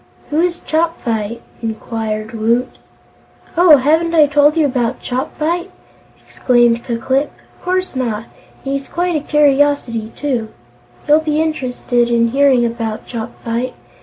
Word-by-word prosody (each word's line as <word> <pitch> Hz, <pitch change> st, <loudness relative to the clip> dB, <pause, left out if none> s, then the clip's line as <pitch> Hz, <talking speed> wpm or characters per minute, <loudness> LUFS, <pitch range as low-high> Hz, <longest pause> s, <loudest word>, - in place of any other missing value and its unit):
"Who 300 Hz, -, +1 dB
is 345 Hz, 0 st, +1 dB
Chopfyt?" 235 Hz, -10 st, -1 dB, 0.2 s
inquired 220 Hz, -1 st, -4 dB
Woot. 230 Hz, +3 st, -1 dB, 0.8 s
"Oh, 335 Hz, -3 st, +7 dB
haven't 320 Hz, +5 st, +2 dB
I 310 Hz, -2 st, +7 dB
told 290 Hz, +2 st, +3 dB
you 315 Hz, -, +4 dB
about 250 Hz, -2 st, -1 dB
Chopfyt?" 315 Hz, +8 st, -2 dB, 0.6 s
exclaimed 240 Hz, -2 st, +2 dB
Ku 235 Hz, -2 st, -3 dB
Klip. 265 Hz, +5 st, 0 dB, 0.3 s
"Of -, -, -27 dB
course 370 Hz, -3 st, -1 dB
not! 230 Hz, -4 st, -2 dB, 0.4 s
And 270 Hz, -, -2 dB
he's 275 Hz, 0 st, -3 dB
quite 350 Hz, 0 st, -1 dB
a -, -, +2 dB
curiosity, 285 Hz, -6 st, +1 dB
too. 250 Hz, -7 st, -2 dB, 0.6 s
You'll 300 Hz, +1 st, +6 dB
be 310 Hz, -1 st, -1 dB
interested 250 Hz, -6 st, 0 dB
in 235 Hz, -1 st, +2 dB
hearing 265 Hz, -1 st, +3 dB
about 230 Hz, -2 st, -4 dB
Chopfyt. 235 Hz, +1 st, -4 dB
260 Hz, 135 wpm, -17 LUFS, 230-305 Hz, 0.8 s, Oh